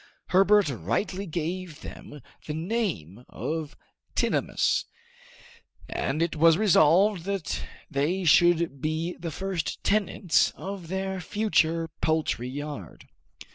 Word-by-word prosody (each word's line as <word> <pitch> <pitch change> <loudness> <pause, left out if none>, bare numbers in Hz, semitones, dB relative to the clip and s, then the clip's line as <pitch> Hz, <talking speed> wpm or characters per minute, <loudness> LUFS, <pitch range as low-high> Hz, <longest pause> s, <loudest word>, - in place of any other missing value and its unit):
Herbert 195 +1 +5
rightly 140 - -2
gave 170 0 -4
them 150 - -10 0.3
the 150 - -3
name 160 - -3
of 155 -2 -4 0.4
tinamous, - - +1 1.0
and 155 +4 -1
it 170 - -2
was 165 +1 +5
resolved 185 -1 +4
that 195 -4 -2 0.3
they 155 +7 0
should 170 -3 +4
be 160 +3 -2
the 170 - -4
first 185 0 -3
tenants 200 -4 +2
of 195 -3 -7
their 190 +1 -3
future 165 -5 +1
poultry 155 -6 0
yard. 145 - -7
165 Hz, 105 wpm, -27 LUFS, 155-190 Hz, 1.0 s, Herbert